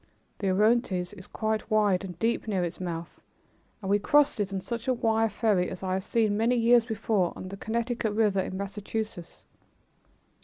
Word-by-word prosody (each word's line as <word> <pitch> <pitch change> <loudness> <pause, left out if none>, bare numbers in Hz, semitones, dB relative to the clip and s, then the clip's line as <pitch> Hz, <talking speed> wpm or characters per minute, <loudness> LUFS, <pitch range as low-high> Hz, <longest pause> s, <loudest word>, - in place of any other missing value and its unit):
The 195 - 0
Orontes 205 -2 +2
is 185 -3 -11
quite 220 0 -2
wide 205 -4 +3
and 180 -3 -7
deep 225 +4 0
near 195 -4 0
its 175 0 -4
mouth 170 -2 -5 0.6
and 190 - -2
we 205 - +4
crossed 290 +3 +3
it 200 -1 -1
on 195 - -2
just 185 - -7
such 235 0 -4
a 255 - +2
wire 225 -1 +2
ferry 205 -3 +1
as 185 - -7
I 185 -1 -1
had 190 - 0
seen 215 +1 +1
many 230 +4 +2
years 235 0 +5
before 215 -5 0
on 185 - -7
the 195 - -7
Connecticut 230 0 -2
River 210 -3 +2
in 190 0 -3
Massachusetts. 205 -1 -5
210 Hz, 190 wpm, -28 LUFS, 190-225 Hz, 0.6 s, years